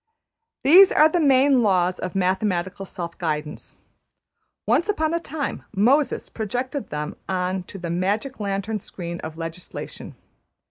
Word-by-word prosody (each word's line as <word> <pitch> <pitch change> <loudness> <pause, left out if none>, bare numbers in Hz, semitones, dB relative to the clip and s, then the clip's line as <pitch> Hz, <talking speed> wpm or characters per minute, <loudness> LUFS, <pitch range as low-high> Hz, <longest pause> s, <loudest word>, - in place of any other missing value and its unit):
These 365 +7 +8
are 310 +1 +6
the 350 - +1
main 275 -3 +4
laws 185 -4 +2
of 185 0 -5
mathematical 190 0 -1
self 170 -2 -6
guidance. 150 -2 -4 0.9
Once 345 - +2
upon 315 -5 +1
a 335 - +1
time 305 -3 -4 0.2
``Moses'' 260 +6 +2
projected 250 +5 -3
them 150 0 -4
on 185 0 -1
to 195 - -9
the 175 -3 -5
magic 205 +10 -1
lantern 200 +1 -2
screen 170 -2 -7
of 160 0 -7
legislation. 165 +1 -7
195 Hz, 135 wpm, -23 LUFS, 180-270 Hz, 0.9 s, These